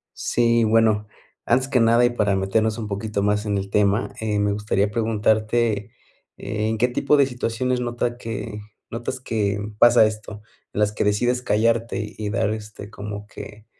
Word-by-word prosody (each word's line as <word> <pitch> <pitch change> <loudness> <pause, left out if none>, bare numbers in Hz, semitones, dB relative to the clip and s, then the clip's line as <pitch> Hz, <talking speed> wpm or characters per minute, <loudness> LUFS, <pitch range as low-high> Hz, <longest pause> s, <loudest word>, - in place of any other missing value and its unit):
Sí, 115 -1 +2
bueno, 110 -1 +3 0.4
antes 130 +1 +2
que 125 - +2
nada 115 +1 +4
y - - +4
para 105 -5 0
meternos 110 +3 0
un 110 -2 -4
poquito 100 0 -3
más 105 +1 +1
en 100 -1 0
el 100 0 -4
tema, 100 +2 +1
eh, 105 -2 -1
me 100 0 +1
gustaría 105 0 0
preguntarte. 110 -1 0 0.5
¿En 110 +1 -2
qué 125 - +3
tipo 140 +4 +2
de 140 - +5
situaciones 125 0 -2
nota 120 0 -2
que 115 -2 -6 0.3
notas 120 +3 -4
que 105 -5 -1 0.2
pasa 120 -2 +6
esto? 105 -1 -5 0.3
En - - -3
las 105 0 +2
que - - -1
decides 120 +5 +1
callarte, 115 -2 0
y 105 -1 -3
dar, 110 -1 0
este, 105 -1 -7
como 105 -1 -7
que 105 0 -11
110 Hz, 170 wpm, -22 LUFS, 105-115 Hz, 0.5 s, pasa